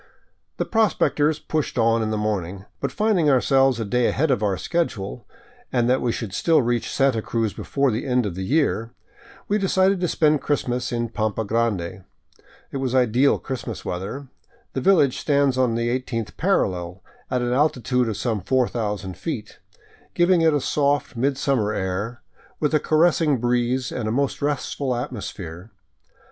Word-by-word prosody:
The - - -1
prospectors 160 -8 +2
pushed 155 -2 -3
on 115 0 +3
in 110 - -1
the 110 - -1
morning, 100 -3 -3
but - - -2
finding 210 -8 +2
ourselves 135 -1 +3
a 115 - -2
day 125 +3 +1
ahead 150 +1 +1
of 125 - +1
our 100 -3 +1
schedule, 115 - -3 0.4
and 120 -2 +2
that 130 +1 +2
we 120 - +1
could 110 -5 -5
still 165 +9 +3
reach 120 0 -1
Santa 135 -5 +2
Cruz 115 -1 -1
before 140 -2 0
the 110 +5 -3
end 125 -2 +2
of 100 - -3
the 95 - -6
year, 120 -1 0 0.5
we 210 +1 +1
decided 190 0 +2
to 180 - 0
spend 155 -3 +2
Christmas 125 -4 -1
in 120 -1 -1
Pampa 110 -1 -2
Grande. 100 -5 -1 0.7
It - - -3
was 130 -1 -1
ideal 125 +2 +3
Christmas 130 -4 -6
weather. 100 +10 -5 0.5
The 135 - -2
village 150 -7 +3
stands 140 -3 +2
on 125 -3 +1
the 115 0 0
eighteenth 120 -3 -3
parallel, 90 - -1 0.3
at 125 -1 0
an 120 0 0
altitude 125 -3 +1
of 105 - -3
some 110 -5 -1
4cxx:> 105 -4 -1
feet, - - -6 0.6
giving 175 0 +4
it 165 -1 +5
a 145 -2 +1
soft 145 0 0
midsummer 130 -3 0
air, 100 +5 -3 0.4
with 150 0 0
a 155 - +4
caressing 155 -2 +3
breeze 120 +1 0
and 120 -4 -3
a - - 0
most 140 +3 -1
restful 140 -2 -1
atmos 120 -3 -4
phere. 90 +2 -9
125 Hz, 165 wpm, -23 LUFS, 110-145 Hz, 0.7 s, it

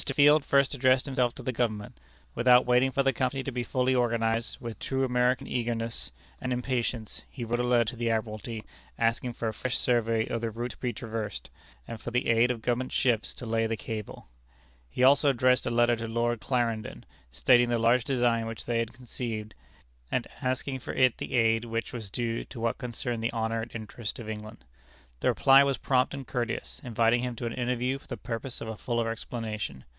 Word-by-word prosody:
Field 145 +1 +6
first 140 0 +3
addressed 130 -1 +3
himself 130 -4 0
to 130 - -9
the 130 - -1
Government. 110 - -2 0.3
Without 125 +1 +5
waiting 125 +2 +4
for 140 +1 +1
the 135 0 +3
Company 130 +2 -1
to 135 - -3
be 125 0 -2
fully 130 +1 +1
organized, 115 -2 +1
with 115 -2 -7
true 135 0 -1
American 125 0 +2
eagerness 115 -2 -3 0.3
and 130 - -2
impatience, 125 -3 -2
he 120 -3 -6
wrote 120 +1 -1
a - - +1
letter 120 -1 +3
to 110 - -4
the 115 0 -1
Admiralty 110 0 -3 0.3
asking 115 +2 +1
for 115 - -3
a 110 - -1
fresh 125 +4 -1
survey 115 -2 +2
of 115 - -2
the 115 - -1
route 120 +3 -4
to - - -13
be 125 - -2
traversed, 115 -3 -5 0.4
and 115 - -7
for - - -4
the 125 +1 0
aid 115 +1 +4
of 115 -3 -3
Government 125 +1 0
ships 120 -4 +1
to - - -8
lay 115 0 +1
the 115 0 -2
cable. 110 - -6 0.6
He 95 - -1
also 140 +2 +6
addressed 125 -1 +3
a - - 0
letter 120 0 +4
to 115 0 -4
Lord 120 0 0
Clarendon, 115 -4 -1 0.3
stating 120 - +4
the 120 - +2
large 115 +2 +3
design 120 -4 +1
which 115 -2 -6
they 120 -1 0
had 115 0 -2
conceived, 115 -3 -5 0.6
and - - 0 0.2
asking 130 +1 -1
for - - -6
it 130 -2 +3
the - - -3
aid 115 -1 +3
which 115 0 -3
was 110 -5 -5
due 115 +2 -2
to 120 - -10
what 115 0 -1
concerned 120 -2 -3
the 115 - +1
honor 115 0 -1
and 115 - -7
interest 110 +1 -5
of 115 -4 -8
England. 110 -2 -7 0.5
The - - 0
reply 135 +1 +6
was 140 -2 +1
prompt 130 +2 +1
and 135 -1 -7
courteous, 120 -2 -3
inviting 120 0 +2
him 125 -1 -3
to 120 - -5
an 115 - -2
interview 125 +2 -1
for - - -22
the - - -5
purpose 120 +1 -4
of 115 - -5
a 110 - -4
fuller 115 0 -1
explanation. 110 - -5
120 Hz, 205 wpm, -28 LUFS, 115-125 Hz, 0.6 s, Field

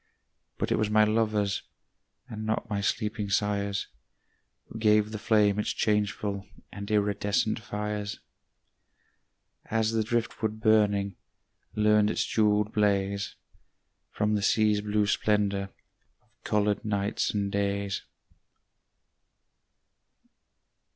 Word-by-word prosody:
But - - -2
it - - +2
was 110 -1 +1
my 110 0 +5
lovers, 105 -2 +1 0.7
And 110 -1 -6
not 110 +2 -1
my 100 -1 0
sleeping 105 0 -1
sires, 100 0 0 0.8
Who 110 - -9
gave 105 -1 +3
the 110 - -5
flame 105 -2 +3
its 105 - 0
changeful 105 -2 -1 0.2
And 100 0 -7
iridescent 105 0 +1
fires; 105 -2 -4 1.5
As 110 0 +1
the 115 -1 +1
driftwood 110 -1 -2
burning 105 -3 +2 0.6
Learned 105 0 +4
its - - 0
jewelled 105 -1 +2
blaze 100 -1 0 0.7
From 105 +1 0
the 105 - +1
sea's 105 0 +3
blue 105 0 +1
splendor 100 -1 +1 0.5
Of - - -37
colored 105 -1 +1
nights 100 -1 -1
and 100 -1 -1
days. 100 -1 -1
105 Hz, 105 wpm, -28 LUFS, 100-110 Hz, 1.5 s, my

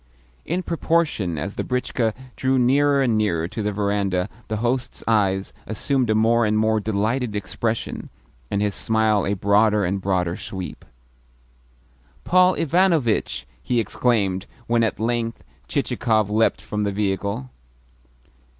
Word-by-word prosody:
In 180 +2 -1
proportion 160 - 0
as 100 +7 -4
the - - -3
britchka 125 -3 -1 0.2
drew 130 0 +1
nearer 140 +3 +3
and 120 -4 +2
nearer 85 -6 0
to 110 - -5
the 105 0 -1
verandah, 100 -2 0 0.2
the 110 - -2
host's 120 +3 -2
eyes 100 -3 +1
assumed 125 +3 0
a 110 - +3
more 115 +2 +3
and 105 0 +2
more 110 0 +2
delighted 110 +3 -1
expression, 110 +3 -3 0.4
and 100 +1 0
his 105 -1 0
smile 110 0 +1
a 100 - 0
broader 105 +1 +3
and 95 +2 -1
broader 90 -2 0
sweep. 95 -1 -7 1.4
"Paul 185 +1 +4
Ivanovitch!" 155 - +1 0.2
he 120 -2 0
exclaimed 105 -4 0 0.2
when 115 0 +2
at 110 -4 -1
length 115 0 -1 0.2
Chichikov 110 -3 0
leapt 110 +1 +2
from 105 -1 -4
the 100 -1 0
vehicle. 100 +5 -2
110 Hz, 135 wpm, -23 LUFS, 100-120 Hz, 1.4 s, Paul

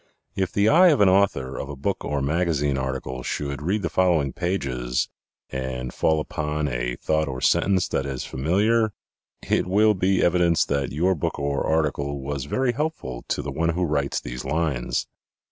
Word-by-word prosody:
If 95 -2 -1
the 100 +1 +2
eye 175 +9 +7
of 150 -6 +4
an 100 -2 +6
author 95 -9 +1
of 70 - -5
a 70 - -5
book 65 - -2
or 70 -2 -1
magazine 75 -2 +1
article 65 -1 -3
should 70 +2 -3
read 95 +6 -1
the - - +1
following 85 -7 +2
pages 65 -9 -1 0.4
and 65 -1 -4
fall 80 -1 +2
upon 75 0 -2
a - - -2
thought 80 0 0
or 65 -2 -4
sentence 95 +7 +2
that 70 - -1
is 65 -2 -4
familiar 105 - +1 0.5
it - - +1
will 105 +3 +4
be 95 0 +1
evidence 85 -1 +3
that 70 -1 -1
your 90 +6 +2
book 80 - -3
or 70 -1 -1
article 70 -3 0
was 70 0 -4
very 130 - +1
helpful 120 - -4
to - - -1
the - - -4
one 85 +1 0
who 90 +2 0
writes 70 -3 0
these - - -6
lines. 75 -3 -1
75 Hz, 180 wpm, -24 LUFS, 70-95 Hz, 0.5 s, eye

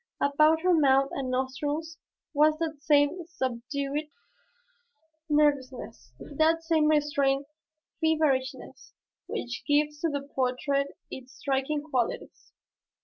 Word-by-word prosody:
About 305 +3 +3
her 365 +1 +3
mouth 275 -3 +4
and 265 -2 -3
nostrils 290 +5 -3 0.3
was 305 +1 +4
that 315 -3 -4
same 290 +4 +3
subdued 280 +1 -3 1.2
nervousness, 265 - 0
that 315 +3 +1
same 325 -2 +2
restrained 285 -2 +2 0.6
feverishness 300 -5 0 0.3
which 245 +1 -5
gives 295 0 +1
to 330 - 0
the 285 -2 -3
portrait 275 +2 -1
its 260 +1 -9
striking 280 +2 -1
qualities. 260 -6 -3
290 Hz, 100 wpm, -28 LUFS, 265-310 Hz, 1.2 s, mouth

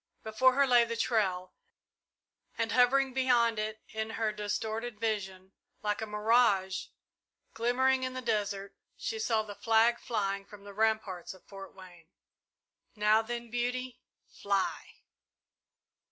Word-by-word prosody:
Before 235 +4 +3
her 280 0 +4
lay 245 -2 +5
the 230 0 -4
trail 190 -6 0 1.0
and 230 0 -1
hovering 255 +2 +3
beyond 240 -4 +2
it 215 0 -4
in 220 0 -4
her 225 -1 -1
distorted 215 +2 -4
vision, 190 -4 -3 0.3
like 210 0 -1
a 220 - -3
mirage 210 -3 +2 0.7
glimmering 260 +3 +2
in 255 0 -3
the 255 - -4
desert, 200 -3 -2 0.2
she 225 - -4
saw 220 0 +1
the 210 -1 -8
flag 225 +2 +3
flying 200 -3 -2
from 200 0 -14
the 200 0 -10
ramparts 210 -4 -1
of 185 - -20
Fort 195 -1 -11
Wayne. 175 -3 -14 0.9
"Now 215 +1 +4
then, 235 0 -6
Beauty 250 +1 -3 0.3
fly!" 200 -1 -3
220 Hz, 130 wpm, -30 LUFS, 200-240 Hz, 1.0 s, lay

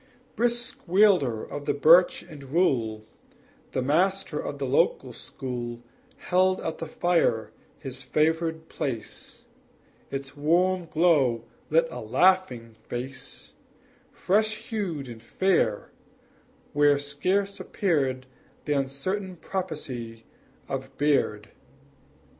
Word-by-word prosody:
Brisk 240 +1 -1
wielder 175 - +4
of 145 0 -7
the - - 0
birch 165 +5 +6
and 145 -3 -11
rule, 115 -10 +1 0.7
The 130 - 0
master 175 +3 +1
of 145 - -4
the 140 - -2
district 130 - +1
school 120 -2 -6 0.3
Held 185 +1 +2
at 160 - -4
the 165 - -4
fire 160 -10 +1 0.3
his 135 0 -8
favored 160 +1 0
place, 120 -9 -5 0.6
Its 135 0 -5
warm 175 +4 +2
glow 145 -9 +3 0.2
lit 165 +2 +4
a - - -6
laughing 125 - +2
face 130 +2 -6 0.6
Fresh 215 +3 0
hued 175 - -2
and 115 -2 -9
fair, 115 - +1 0.8
where 145 0 +5
scarce 180 +8 -1
appeared 135 -9 0 0.4
The 150 - +1
uncertain 180 +8 -2
prophecy 135 -12 -5 0.4
of 135 0 -5
beard. 135 -8 +1
145 Hz, 105 wpm, -26 LUFS, 130-180 Hz, 0.8 s, birch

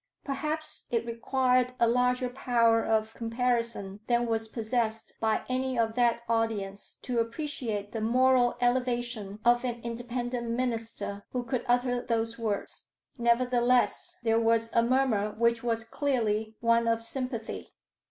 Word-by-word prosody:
Perhaps 310 +2 -4
it 230 -1 0
required 250 +1 +1
a 235 - +5
larger 250 +1 +2
power 235 -3 +2
of 220 0 0
comparison 230 -4 -1
than 240 0 +2
was 225 -1 -1
possessed 225 0 -2
by 220 -1 +1
any 255 0 -1
of 225 -1 +1
that 235 -1 +2
audience 220 -4 -1
to 245 -2 -1
appreciate 230 -4 -3
the 225 - -4
moral 250 +1 +3
elevation 240 -4 0
of 240 +1 +4
an 240 -2 -2
Independent 240 0 -3
minister 230 -4 -2
who 250 -1 -1
could 240 +1 -2
utter 245 0 +2
those 230 -1 -1
words. 215 -3 -3 0.3
Nevertheless 245 +1 +2
there 225 -1 +3
was 230 0 +2
a 230 - +5
murmur 235 -4 +1
which 235 0 +2
was 230 -1 -1
clearly 220 -4 -1
one 230 0 +3
of 230 0 +1
sympathy. 245 -2 -5
235 Hz, 135 wpm, -29 LUFS, 225-250 Hz, 0.3 s, a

